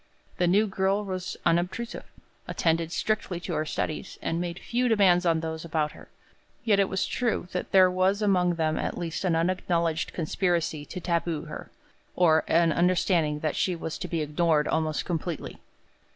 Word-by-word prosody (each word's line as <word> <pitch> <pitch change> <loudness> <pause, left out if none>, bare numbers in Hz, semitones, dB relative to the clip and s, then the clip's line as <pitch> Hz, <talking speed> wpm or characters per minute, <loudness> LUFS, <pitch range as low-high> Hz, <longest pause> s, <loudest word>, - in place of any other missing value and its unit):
The 180 - +3
new 200 +5 +4
girl 195 +1 0
was 185 -1 -4
unobtrusive, 180 +8 0 0.4
attended 165 0 0
strictly 195 -3 -1
to 175 - -4
her 155 0 -1
studies, 155 - -3
and 165 +1 -2
made 175 -1 -4
few 245 +5 -1
demands 190 -6 +4
on 165 -1 +2
those 160 -1 -4
about 155 -2 -1
her; - - -15 0.5
yet 210 -4 +3
it 195 - +3
was 190 - 0
true 235 -7 -1
that 180 - -4
there 185 -1 +6
was 185 +2 +2
among 180 -4 +2
them 155 -1 0
at - - -3
least 170 0 -4
an 175 -3 +2
unacknowledged 170 -1 0
conspiracy 165 -2 -1
to 180 - -7
taboo 170 -2 -1
her, - - -8 0.5
or 160 -3 +4
an 165 0 +4
understanding 170 -3 +2
that 155 - -1
she 185 - 0
was 165 -1 -5
to - - -4
be 165 -2 -2
ignored 150 0 +1
almost 155 -1 0
completely. 170 -2 -4
175 Hz, 170 wpm, -27 LUFS, 160-185 Hz, 0.5 s, there